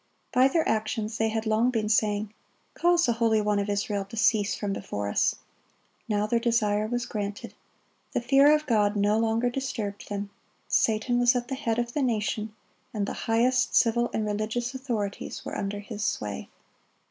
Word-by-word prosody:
By 255 +1 +6
their 320 +4 +1
actions 220 0 -1
they 225 0 +2
had 220 0 -2
long 220 +3 +2
been 225 -4 -1
saying, 210 0 +1 0.4
"Cause 345 0 +3
the 235 - +2
Holy 225 -1 +2
One 210 -1 +1
of 200 +1 -2
Israel 205 0 -1
to 210 +4 -10
cease 215 -1 +2
from 205 -2 -3
before 105 - -4
us."(38) - - +1 0.7
Now 210 -1 +1
their 230 +2 +1
desire 215 -3 +1
was 245 +1 -2
granted. 205 -2 -5 0.6
The - - 0
fear 275 +4 +5
of 305 0 -2
God 210 -4 +2
no 205 +1 +2
longer 230 +2 +1
disturbed 235 -6 -4
them. 200 0 -4 0.4
Satan 230 +2 +2
was 245 +1 +4
at 245 0 -2
the - - -2
head 230 -4 -1
of 240 0 -2
the 295 - 0
nation, 215 -3 -1 0.4
and 205 -1 0
the - - -4 0.2
highest 255 +3 +2
civil 235 0 +3
and 215 - -1
religious 220 +4 -2
authorities 235 -7 -4
were - - -5
under 200 0 -3
his 210 0 -6
sway. 105 - -3
220 Hz, 180 wpm, -27 LUFS, 205-240 Hz, 0.7 s, By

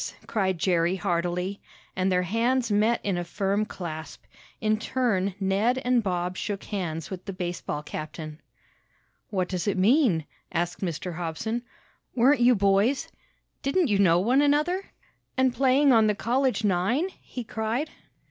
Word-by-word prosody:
cried 190 -4 0
Jerry 175 0 +2
heartily, 180 +1 -1 0.3
and 185 +1 +1
their 180 0 +2
hands 235 +5 +1
met 215 +3 +3
in 190 -3 0
a - - -2
firm 200 +4 -1
clasp. 160 -6 -7 0.4
In 215 0 +1
turn 205 -7 0
Ned 200 +6 +1
and 250 -1 +3
Bob 180 -2 -2
shook 205 -2 -3
hands 165 -7 -4
with 185 -1 -6
the 195 - -5
baseball 175 -4 -4
captain. 155 +1 -7 0.9
"What 185 -4 -1
does 180 +1 -3
it 205 - +1
mean?" 205 - +3 0.3
asked 175 +1 -2
Mr. 175 -1 -3
Hobson. 180 +8 -3 0.5
"Weren't 260 +3 +4
you 245 +1 +6
boys 200 +6 +2 0.5
Didn't 285 +2 +1
you 200 -1 +2
know 175 -3 +5
one 245 +9 +3
another 300 +6 +2 0.5
and 260 -1 +3
playing 270 +2 +4
on 220 -2 +5
the 210 - +2
college 250 +2 0
nine?" 210 - +1
he 250 - -7
cried. 225 +7 -2
200 Hz, 145 wpm, -26 LUFS, 180-240 Hz, 0.9 s, you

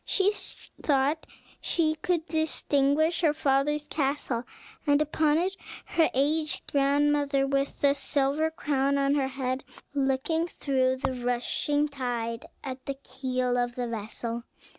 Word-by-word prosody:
She 395 +1 +3 0.5
thought 285 +2 +1 0.3
she 315 -2 +2
could 325 +1 -1
distinguish 315 0 +1
her 305 -3 +3
father's 295 +1 +1
castle, 270 -4 -1 0.4
and 285 0 +5
upon 305 0 +2
it 370 +3 0 0.3
her 325 -2 +3
aged 305 +3 +1
grandmother, 285 0 +3
with 275 0 -1
the 280 -1 +5
silver 280 +2 +1
crown 280 -3 0
on 275 0 +2
her 280 -2 +2
head, 260 0 -2 0.3
looking 280 +4 +1
through 260 -5 +1
the 260 0 -2
rushing 250 +4 0
tide 240 -5 -3 0.2
at 260 -1 -6
the 275 - -2
keel 255 -2 -1
of 245 0 -1
the 245 -1 -2
vessel. 230 +1 -4
280 Hz, 130 wpm, -28 LUFS, 260-300 Hz, 0.5 s, and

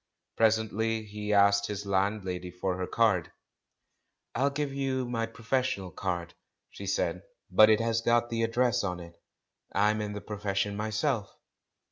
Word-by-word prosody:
Presently 110 0 +1
he 105 0 -5
asked 100 0 +4
his 105 -1 -4
landlady 95 -2 -1
for 90 +1 -2
her 90 - -2
card, 105 -7 +2 1.0
"I'll 135 - +1
have 140 0 0
to 150 - 0
give 140 -2 -4
you 135 -2 -1
my 115 -2 -1
professional 115 -4 -2
card," 85 -1 -3 0.4
she 100 - -8
said, 100 - 0 0.3
"but 110 0 +7
it 110 +1 +4
has 115 0 +1
got 120 +1 +2
the 115 0 0
address 120 +1 +2
on 90 -2 -2
it; 85 -1 -12 0.5
I'm 105 +2 +3
in 105 -1 -3
the 105 - -4
profession 100 -1 -2
myself." 110 +1 -1
105 Hz, 155 wpm, -29 LUFS, 100-115 Hz, 1.0 s, but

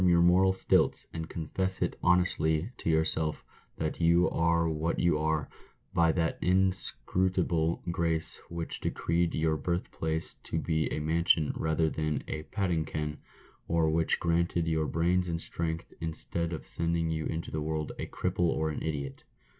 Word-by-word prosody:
21 90 -1 +5
your 85 0 +5
moral 95 +2 +5
stilts, 95 - +2
and 80 -1 -5
confess 95 +4 -1
it - - 0
honestly 90 0 +2
to - - -3
yourself 80 -1 +1 0.3
that 80 +2 -3
you 85 +2 +5
are 85 0 +2
what 80 +1 -1
you 85 -3 +2
are 80 -1 0 0.5
by 85 -1 +4
that 80 -1 -1
inscrutable 90 -2 +1
grace 85 -2 0
which 85 -1 -5
decreed 85 0 0
your 80 0 +1
birthplace 80 0 -2
to - - -3
be 80 -1 0
a - - -1
mansion 80 0 +2
rather 80 0 +1
than 75 -1 -1
a 75 - -3
"padding 90 -6 0
ken," 75 -1 -4 0.5
or 80 -1 +2
which 80 0 +1
granted 85 0 +1
you 80 -1 +1
brains 90 +2 +1
and 85 -1 -2
strength, 80 0 +1
instead 80 +1 -2
of 80 - -6
sending 85 -1 -1
you 80 -1 -2
into 80 0 -4
the 75 - -2
world 75 0 -2
a - - -3
cripple 90 -1 0
or 80 -1 0
an - - -5
idiot. 70 -4 -4
80 Hz, 160 wpm, -30 LUFS, 80-85 Hz, 0.5 s, 21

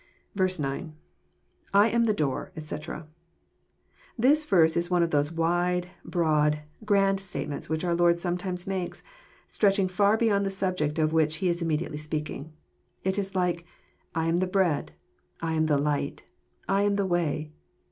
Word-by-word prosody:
9. 190 -2 +3
— 185 -2 0
II 140 +3 -3 0.8
am 230 +3 +5
the 220 - +3
door, 145 +1 -2
etc.'] 155 0 -6 1.1
This 290 +6 +4
verse 165 - +4
is 170 0 +1
one 175 -1 +3
of 165 - -1
those 145 +1 +1
wide, 175 +2 0
broad, 150 -3 +1 0.2
grand 195 -2 +3
statements 175 -8 -5
which 160 +1 -1
our 175 - +1
Lord 170 0 +3
sometimes 180 +1 -2
makes, 190 -2 -4 0.4
stretching 195 -2 +2
far 200 +4 +3
beyond 210 -3 +2
the 195 - 0
subject 185 -6 -1
of 155 0 +1
which 160 -1 +2
He 185 +2 0
is 170 0 -1
immediately 160 -2 -1
speaking. 150 0 -4 0.5
It 190 +2 0
is 195 -1 -4
like, 180 -2 0 0.5
I 160 0 0
am 165 +1 +2
the 185 +1 +1
Bread,— 180 -5 +1 0.5
I 165 -1 -2
am 155 0 +2
the 150 -2 +3
Light, 145 0 -1 0.3
— - - -36
I 195 0 +2
am 205 0 +2
the 200 -1 +1
Way." 160 -4 -1
175 Hz, 165 wpm, -27 LUFS, 155-195 Hz, 1.1 s, am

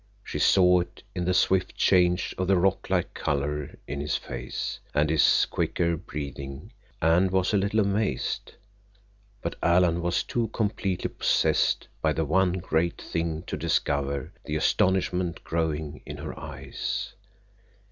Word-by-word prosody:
She - - -4
saw 90 -2 +5
it 90 - -6
in 90 - -2
the 90 - +2
swift 95 0 +2
change 90 -1 +3
of 95 - 0
the 95 -1 +4
rock 95 +2 +1
like 90 -2 0
color 75 0 -2
in 70 -1 -3
his 75 - -1
face, - - -5 0.2
and 75 +1 +3
his 80 -2 +5
quicker 85 -1 0
breathing, 70 -4 -7 0.3
and 85 +4 +4
was 95 +1 +1
a - - +5
little 100 +3 +2
amazed, 100 - -1 0.9
but 85 - -3
Alan 85 -1 +3
was 85 +1 0
too 120 -2 -1
completely 100 -4 -1
possessed - - +2
by 80 -1 +2
the 80 0 0
one 90 +4 +2
great 85 -2 0
thing 80 -1 -3
to - - -4
discover 70 -1 -1
the 75 - -4
astonishment 90 0 +1
growing 80 -2 -2
in - - -7
her - - -6
eyes. - - -4
85 Hz, 145 wpm, -27 LUFS, 75-95 Hz, 0.9 s, saw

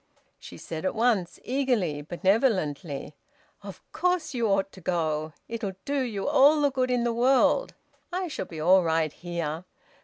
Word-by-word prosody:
She - - -11
said 160 -1 -6
at 190 - -1
once, 220 -6 +1
eagerly 245 - 0
and 145 - -11
benevolently 175 - 0 0.5
"Of - - -10
course 360 -4 0
you 235 -3 0
ought 195 -1 +1
to 190 - -14
go. 155 -3 -1
It'll 215 -4 -4
do 285 -1 0
you 215 -6 -3
all 290 +1 +5
the 285 -1 +3
good 255 -1 0
in 245 -1 +1
the 235 -1 0
world. 260 - +3 0.4
I 365 +1 -2
shall 310 - -5
be 160 - -8
all 185 +4 +5
right 160 -2 0
here. 170 -2 -4
195 Hz, 165 wpm, -27 LUFS, 165-255 Hz, 0.5 s, all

